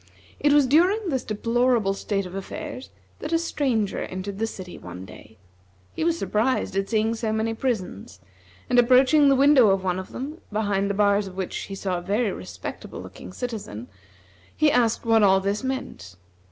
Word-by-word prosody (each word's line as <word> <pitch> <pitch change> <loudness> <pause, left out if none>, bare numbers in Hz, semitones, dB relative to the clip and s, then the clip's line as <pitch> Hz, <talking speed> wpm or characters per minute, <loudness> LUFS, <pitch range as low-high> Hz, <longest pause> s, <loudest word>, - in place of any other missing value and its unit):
It 290 - +3
was 290 -1 +5
during 360 - +3
this 265 -4 -1
deplorable 230 -1 +1
state 195 0 -2
of 180 - -9
affairs 255 +8 -7 0.3
that 305 - -5
a 330 - +4
stranger 260 - -1
entered 190 +2 -5
the 225 - 0
city 185 -4 -8
one 90 +1 -9
day. 105 +3 -14 0.6
He - - -3
was 335 0 +1
surprised 225 - 0
at 195 0 -1
seeing 220 0 +1
so 225 -1 -2
many 220 +1 -1
prisons, 195 - -4 0.5
and 245 - +4
approaching 260 +4 +5
the 275 - +5
window 270 -5 +6
in 190 - -7
one 185 0 -1
of 190 - -8
them, 295 +6 -6
behind 205 -2 0
the 200 - -1
bars 205 0 +2
of 185 0 -11
which 190 -2 -3
he 195 - -5
saw 190 -2 -2
a - - -9
very 205 +4 0
respectable - - -8
looking - - -10
citizen, 210 - -6 0.7
he 305 -1 +4
asked 240 -2 +1
what 225 -1 +4
all 190 -2 +5
this 200 +4 -2
meant. 260 - -5
220 Hz, 180 wpm, -24 LUFS, 195-260 Hz, 0.7 s, window